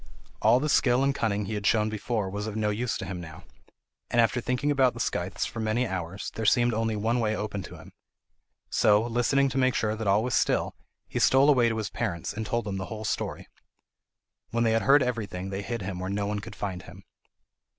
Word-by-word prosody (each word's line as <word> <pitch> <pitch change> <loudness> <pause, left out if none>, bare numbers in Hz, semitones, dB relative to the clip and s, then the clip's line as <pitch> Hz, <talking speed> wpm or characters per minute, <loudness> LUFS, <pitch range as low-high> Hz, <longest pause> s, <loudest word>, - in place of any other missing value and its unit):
All 115 +3 +5
the 150 - -1
skill 130 -3 +3
and 140 0 +2
cunning 105 -6 -1
he 110 - -4
had 105 -1 -1
shown 105 -1 +3
before 110 -1 -2
was 100 +2 -4
of 110 - -5
no 105 -1 0
use 115 +3 -2
to - - -5
him 90 -2 -5
now, 80 -2 -10 0.7
and 120 - +1
after 115 +1 +3
thinking 125 +4 0
about 130 -4 +3
the - - -8
scythes 90 -3 -2
for 115 - -6
many 110 +3 0
hours, 95 -2 -4
there 110 - -4
seemed 120 +3 +3
only 110 0 0
one 115 +4 0
way 110 -2 0
open 105 -2 -3
to 90 - -10
him. - - -14 0.8
So, 105 +2 +4
listening 120 +4 +2
to 135 - -1
make 130 -1 +2
sure 110 -1 0
that 110 -1 -4
all 100 +2 +3
was 125 -1 -2
still, 100 - +1 0.3
he - - -3
stole 135 +3 +5
away 120 -4 +4
to 115 - -2
his 110 - -3
parents, 85 -1 -3
and 110 +1 -4
told 120 0 -1
them 100 -2 -3
the 95 - -4
whole 110 +3 -6
story. - - -3 1.0
When 115 0 0
they 115 - +3
had 115 0 +2
heard 140 +1 +5
everything, 100 -6 -3
they 95 +1 -3
hid 115 0 -4
him 95 -1 -4
where 95 +1 -4
no 100 +1 -1
one 105 0 -2
could - - -9
find 95 -3 -4
him. - - -13
110 Hz, 230 wpm, -27 LUFS, 100-120 Hz, 1.0 s, All